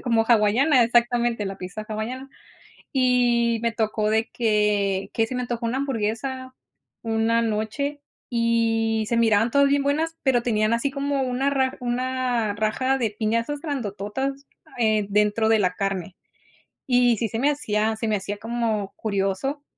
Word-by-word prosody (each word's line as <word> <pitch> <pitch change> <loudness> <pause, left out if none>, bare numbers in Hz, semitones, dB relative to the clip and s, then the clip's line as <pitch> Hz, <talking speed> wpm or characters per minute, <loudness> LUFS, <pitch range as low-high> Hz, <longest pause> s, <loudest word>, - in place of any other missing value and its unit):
sé, - - -14
como 230 -3 +2
hawaiana, 240 +5 +4
exactamente, 235 -2 +1
la 195 0 -5
pizza 185 +4 -7
hawaiana. 235 +5 -5 0.6
Y, 245 -3 +2
me 235 - +1
tocó 215 -1 0
de 220 +1 +1
que 210 -4 +1
que 225 -1 +1
se 255 - -6
me 250 - -1
antojó 240 -1 -3
una 235 +3 -1
hamburguesa 260 +1 -3 0.5
una 225 +1 +1
noche, 230 +7 -2 0.3
y 225 -1 +1
se 235 - 0
miraban 225 0 +3
todas 280 +3 +4
bien 280 0 +2
buenas, 315 +4 0
pero 250 -3 +2
tenían 215 -2 +1
así 235 +4 0
como 280 -1 -1
una 260 +2 0
ra 265 -2 0
una 245 -3 -1
raja 240 +5 0
de 230 -4 0
piñazas 230 +6 -1
grandototas, 270 - -4 0.3
eh, 215 -3 +2
dentro 210 +2 +2
de 225 - +4
la 180 -2 +1
carne. 190 -2 -3 0.7
Y 245 -2 +4
sí 225 - -1
se 225 - -3
me 280 +4 +3
hacía 220 -5 -1
se 225 0 -3
me 215 - +1
hacía 200 +1 -5
como 225 -3 -2
curioso 205 +7 -2
230 Hz, 160 wpm, -24 LUFS, 215-255 Hz, 0.7 s, hawaiana